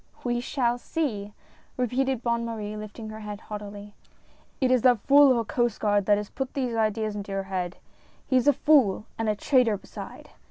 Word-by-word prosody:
"We 240 -1 0
shall 245 -2 0
see 210 -10 -3 0.2
!" - - -33
repeated 255 0 0
Bonne 235 -1 0
Marie, 215 -2 -4
lifting 215 +1 -8
her 215 0 -8
head, 210 -1 -7
haughtily. 205 -1 -8 0.3
" - - -33
It 260 -2 +2
is 255 -2 +4
that 245 -2 +5
fool 280 +2 +6
of 250 - +3
a 230 - -1
Coast 240 +1 0
Guard 205 -2 +1
that 205 -1 +5
has 210 0 -5
put 265 -1 -5
these 255 -4 -1
ideas 215 -1 0
into 205 -1 -6
your 195 0 -2
head! 185 -2 -4 0.5
He 260 - 0
is 255 - +1
a 290 - +7
fool 260 -8 +3
and 225 -1 0
a 210 - +1
traitor 245 -2 +2
beside - - -10
225 Hz, 205 wpm, -26 LUFS, 205-250 Hz, 0.5 s, a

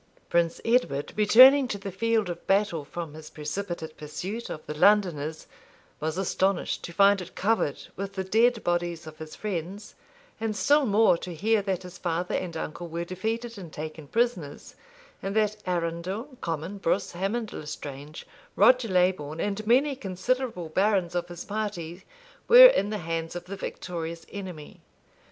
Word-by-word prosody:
[] - - -32
Prince 170 -1 +2
Edward, 230 - +1
returning 255 +6 +7
to 205 - -3
the 200 0 -6
field 225 +1 +1
of 175 -1 -7
battle 195 -5 +2
from 160 +1 -7
his 155 0 -10
precipitate 160 +1 -5
pursuit 180 +10 -6
of 155 - -7
the - - -5
Londoners, 160 -4 +2 0.5
was 160 +2 -2
astonished 190 0 0
to - - -6
find 200 +2 +4
it 180 +1 -10
covered 200 -8 0
with 195 +1 -5
the 190 - -2
dead 225 +4 +2
bodies 175 -2 -1
of 155 -1 -11
his 155 -1 -8
friends, 195 0 -5 0.5
and 220 -1 -2
still 290 +5 +3
more 205 -4 +4
to 180 -2 -7
hear 215 +5 +2
that 190 -2 -2
his 180 0 -11
father 175 +1 -2
and 170 -3 -2
uncle 165 +2 -5
were 170 +1 -4
defeated 225 +5 -4
and 170 -4 -9
taken 155 0 -7
prisoners, 225 - -2 0.5
and 195 +1 -4
that 215 -1 +2
Arundel, 180 - -2
Comyn, 165 +4 -4
Brus, 190 +3 0
Hamond 200 +5 -3
l'Estrange, 150 0 -8 0.3
Roger 250 -2 +5
Leybourne, 180 -5 +1
and 205 +3 -2
many 270 +4 +4
considerable 205 -3 -2
barons 190 -1 +1
of 175 0 -2
his 175 -1 -8
party 195 -4 -4 0.4
were - - +11
in - - +5
the 215 - -2
hands 165 -2 -4
of 175 0 -6
the 195 +2 -6
victorious 170 -3 -6
enemy. 180 -7 -8
185 Hz, 160 wpm, -27 LUFS, 165-210 Hz, 0.5 s, were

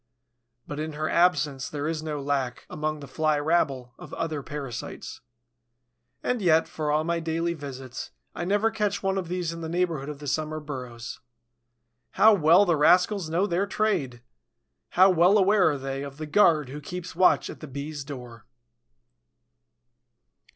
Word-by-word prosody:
But 145 - -5
in 155 0 -4
her 155 +1 -2
absence 150 -7 +2
there 145 0 -3
is 160 -1 -2
no 155 -2 -4
lack, 135 -3 -2
among 155 0 -3
the 140 - -8
Fly 155 +3 +1
rabble, 145 -5 0
of - - -9
other 155 -3 -3
parasites. 140 -5 -7 1.0
And 250 -2 0
yet, 165 -3 +4
for 155 -1 -3
all 155 +1 +2
my 170 +1 -1
daily 165 +1 -1
visits, 135 -4 -7 0.2
I - - -4
never 205 +5 +2
catch 210 -3 -1
one 195 0 +1
of 180 - -5
these 175 -1 -2
in 165 - -8
the 160 - -4
neighborhood 165 -5 -1
of 150 - -6
the 145 - -10
summer 155 +2 -2
burrows. 125 -5 -7 0.9
How 220 0 +6
well 175 +2 +5
the 170 -4 +2
rascals 180 +3 +3
know 175 +5 +1
their 195 +1 0
trade! 175 - -1 0.7
How 185 +2 +6
well 180 +4 +5
aware 195 -2 +4
are 145 - -1
they 135 0 -4
of 140 0 -7
the 155 - -5
guard 155 -4 +3
who 145 +3 -7
keeps 180 +4 -7
watch 185 +1 +4
at - - -9
the 155 - -8
Bees' 140 +2 -6
door! 125 -5 -10
155 Hz, 165 wpm, -26 LUFS, 140-175 Hz, 1.0 s, How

